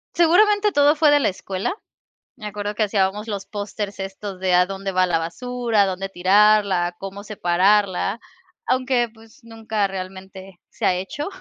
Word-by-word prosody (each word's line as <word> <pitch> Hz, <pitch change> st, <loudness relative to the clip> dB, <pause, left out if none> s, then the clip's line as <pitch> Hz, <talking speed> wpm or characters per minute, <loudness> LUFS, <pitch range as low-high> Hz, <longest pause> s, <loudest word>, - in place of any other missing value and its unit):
Seguramente 410 Hz, +5 st, +4 dB
todo 290 Hz, -2 st, +4 dB
fue 305 Hz, -1 st, +4 dB
de 290 Hz, -, +5 dB
la -, -, +2 dB
escuela, 190 Hz, -, -4 dB, 0.6 s
me 210 Hz, -, -11 dB
acuerdo 205 Hz, 0 st, -4 dB
que 215 Hz, -, +1 dB
hacíamos 205 Hz, +1 st, 0 dB
los 200 Hz, -3 st, -4 dB
posters 205 Hz, -1 st, -5 dB
estos 195 Hz, 0 st, -6 dB
de 185 Hz, -1 st, 0 dB
a 180 Hz, 0 st, +5 dB
dónde 195 Hz, 0 st, -4 dB
va 185 Hz, 0 st, +3 dB
la 170 Hz, -2 st, +1 dB
basura, 235 Hz, +6 st, -1 dB
a -, -, +2 dB
dónde 190 Hz, +1 st, -3 dB
tirarla, 195 Hz, 0 st, +3 dB
a -, -, -5 dB
cómo 195 Hz, +2 st, -8 dB
separarla. 195 Hz, +1 st, +1 dB, 0.5 s
Aunque, 255 Hz, -2 st, +1 dB
pues, 220 Hz, 0 st, -19 dB
nunca 220 Hz, -2 st, -2 dB
realmente 190 Hz, 0 st, -9 dB
se -, -, -5 dB
ha -, -, +4 dB
hecho, 190 Hz, +11 st, -4 dB
200 Hz, 170 wpm, -22 LUFS, 190-225 Hz, 0.6 s, de